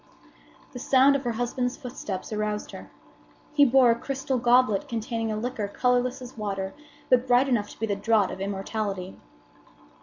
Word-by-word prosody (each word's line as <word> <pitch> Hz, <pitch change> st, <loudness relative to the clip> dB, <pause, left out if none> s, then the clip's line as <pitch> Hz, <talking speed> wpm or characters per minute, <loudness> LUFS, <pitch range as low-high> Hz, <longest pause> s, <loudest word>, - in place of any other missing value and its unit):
The 250 Hz, -, -8 dB
sound 270 Hz, +2 st, +4 dB
of 280 Hz, -, -1 dB
her 240 Hz, -, 0 dB
husband's 245 Hz, +2 st, -2 dB
footsteps 220 Hz, -7 st, -6 dB
aroused 210 Hz, 0 st, -3 dB
her. -, -, -10 dB, 0.6 s
He 290 Hz, -1 st, +6 dB
bore 255 Hz, -2 st, +5 dB
a -, -, +2 dB
crystal 270 Hz, -1 st, -2 dB
goblet 240 Hz, -4 st, +3 dB
containing 225 Hz, -1 st, -3 dB
a 215 Hz, -, -2 dB
liquor 220 Hz, -2 st, -3 dB
colorless 250 Hz, +4 st, 0 dB
as 250 Hz, -, -10 dB
water, 195 Hz, -3 st, -4 dB, 0.4 s
but 255 Hz, 0 st, +3 dB
bright 250 Hz, +2 st, +4 dB
enough 220 Hz, -6 st, 0 dB
to -, -, -14 dB
be 225 Hz, -, 0 dB
the 205 Hz, -2 st, -1 dB
draught 205 Hz, -1 st, +2 dB
of 190 Hz, -, -7 dB
immortality. 195 Hz, -1 st, -4 dB
235 Hz, 170 wpm, -26 LUFS, 210-255 Hz, 0.6 s, He